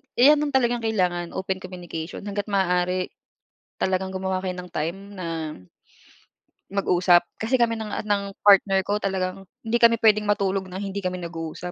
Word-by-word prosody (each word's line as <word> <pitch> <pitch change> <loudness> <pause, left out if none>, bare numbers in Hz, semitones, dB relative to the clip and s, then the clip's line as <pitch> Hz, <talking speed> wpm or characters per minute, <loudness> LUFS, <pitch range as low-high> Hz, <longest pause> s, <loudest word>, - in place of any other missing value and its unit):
iyan 290 +4 +6
yung 295 -2 -1
talagang 240 -2 +2
kailangan, 180 -6 -1
open 190 0 -2
communication, 180 -3 -7
hangga't 205 0 -4
maaari 180 -2 +1 0.7
talagang 190 0 0
gumawa 190 0 -2
kayo 185 -1 -3
ng 180 0 -8
time 165 +5 -2 0.2
na 185 -3 -5 1.5
mag-usap. 180 -3 +4 0.2
Kasi 225 +4 +1
kami 230 -1 +2
ng 220 - -4
a - - -2
ng 200 -2 -1
partner 195 -1 +6
ko, 205 +2 0
talagang 190 -1 -2 0.2
hindi 225 +1 +1
kami 230 0 +6
puwedeng 210 -1 +4
matulog 195 -2 +1
ng 185 +1 -6
hindi 200 0 -4
kami 185 -1 -2
nag-uusap, 165 +1 -6
190 Hz, 160 wpm, -24 LUFS, 180-210 Hz, 1.5 s, iyan